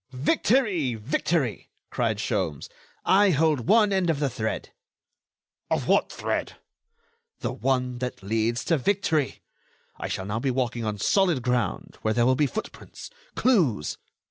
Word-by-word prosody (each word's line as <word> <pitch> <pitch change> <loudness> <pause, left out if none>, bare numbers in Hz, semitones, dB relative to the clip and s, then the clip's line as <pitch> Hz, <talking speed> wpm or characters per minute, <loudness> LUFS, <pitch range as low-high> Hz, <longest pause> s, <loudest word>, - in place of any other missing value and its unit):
"Victory! 180 - +1
Victory!" 125 - -1 0.2
cried - - 0
Sholmes. 80 -7 -2 0.4
"I 200 +1 +5
hold 155 -6 +2
one 210 -2 +5
end 190 -3 +1
of 155 -4 +1
the 140 -3 0
thread." 110 -2 -3 1.0
"Of - - 0
what - - +3
thread?" - - -3 0.9
"The - - -2
one 125 -2 -1
that 125 -5 -5
leads 115 +3 0
to 165 -3 +2
victory. 160 -4 0 0.6
I - - -3
shall 95 - -3
now 105 +3 -2
be 135 - -1
walking 120 -2 -1
on 105 -1 -2
solid 170 - +2
ground, 125 -5 -1
where 110 0 0
there 120 0 +3
will 130 - +4
be 145 +3 +2
footprints, 220 - -8 0.2
clues...." 150 - +2
130 Hz, 145 wpm, -26 LUFS, 115-170 Hz, 1.0 s, I